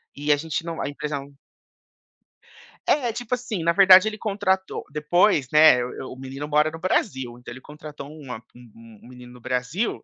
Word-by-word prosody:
E 145 +1 -1
a 145 - +1
gente 160 +2 -4
não 165 -1 -5
a - - -2
empresa 145 0 -4
não 140 +1 -12 1.5
É, 245 -6 +1
tipo 245 +1 -2
assim 225 -8 -5
na 170 - +3
verdade 190 +1 +7
ele 215 0 -4
contratou 190 -3 -1
depois, 150 0 +2
né, 150 -5 +6
o 125 +1 -7
o - - -12
menino 135 +2 -7
mora 150 +1 +2
no 160 - -9
Brasil, 130 - -1
então 125 - -11
ele 130 - -12
contratou 150 -1 -10
uma 135 -7 -9
um 115 -2 -16
um - - -15
menino 125 -1 -13
no 125 - -14
Brasil, 130 - -2
150 Hz, 185 wpm, -23 LUFS, 130-185 Hz, 1.5 s, verdade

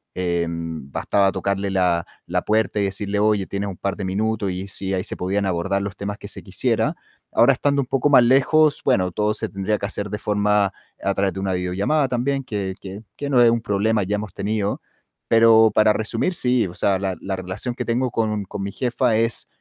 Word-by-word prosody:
em, 85 -4 -3
bastaba 100 +7 +1
tocarle 100 0 -2
la 90 -3 +1 0.2
la - - 0
puerta 110 0 +1
y - - +2
decirle: 100 +1 -2
"Oye, 105 -2 +2
¿tienes 100 0 -3
un 95 - -8
par 100 0 -2
de 100 - -4
minutos?". 105 +1 -1
Y 90 +2 -5
si 95 0 -3
ahí 90 -1 -1
se - - -1
podían 100 +2 -1
abordar 95 +2 0
los 100 0 -5
temas 100 +1 -4
que - - -9
se - - -4
quisiera. - - 0 0.4
Ahora, - - +5
estando 140 -1 0
un - - -3
poco 135 +2 +1
más 135 -4 +7
lejos, 140 +5 +4
bueno, 95 -9 +2
todo 105 +4 0
se - - -3
tendría 100 +2 -1
que - - -3
hacer 105 0 -3
de 105 - -3
forma 105 -2 +1 0.3
a 100 - +1
través 100 0 +1
de 95 - -6
una 95 -1 -1
videollamada 95 +12 0
también, 135 +3 -1
que 100 -6 -3
que 100 +2 -8
que 145 - -4
no 130 -3 +3
es 120 -1 +6
un 115 0 0
problema, 110 0 +1
ya 100 +3 -1
hemos 105 -3 -6
tenido. 105 0 -2 0.5
Pero 115 -1 +6
para 110 0 +4
resumir, 115 - -1
sí, 125 -5 +2
o 85 - -9
sea, 100 -1 +1
la 95 -1 -2
la 95 0 -3
relación 95 +7 -4
que 125 - -4
tengo 125 +2 0
con 110 -3 -1
con 100 +1 -6
mi 100 - -4
jefa 125 0 0
es 115 +1 -1
100 Hz, 215 wpm, -22 LUFS, 95-115 Hz, 0.5 s, más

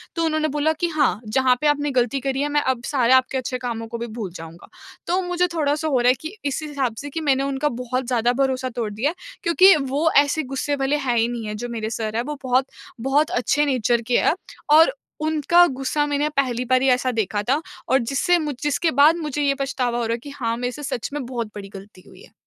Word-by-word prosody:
तो 330 - 0
उन्होंने 310 -1 +1
बोला 305 +2 +2
कि, 330 +2 -1
"हाँ, 295 - +1
जहाँ 255 +3 +3
पे 300 - +2
आपने 295 0 +1
गलती 255 +1 +1
करी 270 +1 -2
है, 290 - 0
मैं 295 0 +2
अब 260 -3 -1
सारे 255 -4 +2
आपके 260 +1 +3
अच्छे 255 0 -3
कामों 230 -2 -4
को 235 +1 -6
भी 235 +1 -5
भूल 205 -6 -4
जाऊँगा।" 165 0 -10 0.4
तो 360 +2 +1
मुझे 355 0 0
थोड़ा-सा 305 -1 0
हो 270 -5 +2
रहा 240 - +2
है 255 - +4
कि 315 +6 -7
इस 280 - -1
हिसाब 275 -6 -2
से 290 - -7
कि 320 +3 -4
मैंने 275 -3 +2
उनका 275 +2 -1
बहुत 255 +1 -2
ज़्यादा 240 -1 +1
भरोसा 260 -1 -1
तोड़ 230 -3 -4
दिया 230 +8 0
है, 330 - -6 0.3
क्योंकि 370 +2 +6
वो 285 +2 0 0.2
ऐसे 310 +2 -1
गुस्से 285 +2 -1
वाले 275 +1 0
हैं 240 -1 +2
ही 230 0 +3
नहीं 235 -2 -5
हैं। 210 - -4
जो 240 +2 -5
मेरे 220 -2 -4
सर 220 -1 -4
हैं, 235 - 0
वो 295 +3 -5
बहुत 255 +1 +2 0.4
बहुत 295 +3 +3
अच्छे 250 +5 +1
नेचर 240 -4 +1
के - - +5
हैं - - +2 0.4
और 325 +10 +6 0.3
उनका 315 +3 +4
गुस्सा 270 +2 -1
मैंने 290 0 0
पहली 250 -3 +1
बार 255 +1 +2
ही 270 - +2
ऐसा 255 0 +2
देखा 205 0 -1
था 285 +4 +2 0.3
और 265 - +4
जिससे 275 +8 +1
मुझ 300 -3 -3
जिसके 295 +3 +1
बाद 290 +5 +5
मुझे 300 -3 -3
ये 280 -1 +3
पछतावा 260 -3 -2
हो 235 - -1
रहा 225 - -1
है 235 - -3
कि 285 - -8
हाँ, 240 -5 -3
मेरे 245 +1 -2
से 295 +4 -9
सच 260 -5 -3
में 290 -3 -4
बहुत 240 -2 -4
बड़ी 200 -1 -8
गलती 195 -1 -12
हुई - - -16
है। - - -19
265 Hz, 245 wpm, -22 LUFS, 240-295 Hz, 0.4 s, क्योंकि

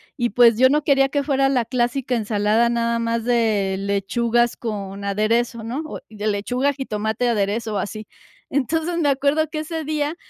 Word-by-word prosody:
y, 240 -4 0
pues, 230 0 +5
yo 260 +1 +6
no 300 +2 +2
quería 275 -1 +3
que 285 0 0
fuera 275 -1 +2
la 250 -4 +1
clásica 250 +1 -1
ensalada 215 +1 +1
nada 235 0 0
más 230 0 -1
de 220 -5 +1
lechugas 220 +5 0
con 200 -3 -5
aderezo, 225 +4 0
¿no? 240 +7 -4
O - - -7
de 215 -1 -5
lechuga, 245 +7 0
jitomate, 220 -3 -2
aderezo 220 0 -1
o - - 0
así. 215 +2 -5 0.4
Entonces 320 +5 -1
me 300 -4 +2
acuerdo 285 +3 +1
que 310 - -4
ese 320 +1 -4
día, 300 +1 -2
235 Hz, 175 wpm, -21 LUFS, 215-275 Hz, 0.4 s, yo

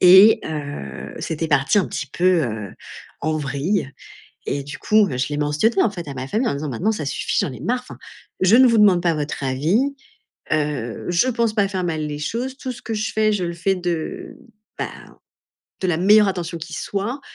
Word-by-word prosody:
Et 190 +4 +8
heu, 145 - -6
c'était 160 0 -3
parti 140 +7 +3
un 190 - +2
petit 140 - -4
peu, 180 +3 +2
heu, 110 -4 -5 0.5
en 155 +1 0
vrille, 145 +3 -1 0.6
et 140 - -1
du 145 - -8
coup, 215 -1 +4
heu, 125 - -3
je 130 +3 -1
l'ai 145 - -2
mentionné 150 +9 +2
en 220 - +2
fait 175 -5 -7
à 140 - -6
ma 130 0 -5
famille 220 - 0
en - - 0
disant: 145 +1 -4
«Maintenant 190 - 0
ça 155 -9 -4
suffit, 145 - -1
j'en - - -2
ai - - -10
marre, 250 +1 0
enfin, 250 - -12 0.4
je 190 +5 +6
ne 260 0 +7
vous 230 -2 +4
demande 195 -4 +5
pas 170 -2 +2
votre 150 -1 -4
avis, 165 - +1 0.6
heu, 145 -6 -1
je 175 +8 +3
pense 235 -3 +1
pas 205 -3 +2
faire 190 -2 -3
mal 160 -3 -1
les 150 0 -5
choses, 245 - -3
tout 260 - -4
ce 245 - -10
que 225 - -4
je 215 +1 -2
fais, 215 0 +2
je 190 -3 -1
le 170 0 -2
fais 180 +3 0
de, 175 +4 -4 0.4
bah, - - -2 0.9
de 185 - 0
la 165 -3 +1
meilleure 205 +3 +6
attention 175 -2 -4
qui 165 0 -8
soit. 210 - -3
175 Hz, 215 wpm, -21 LUFS, 145-210 Hz, 0.9 s, Et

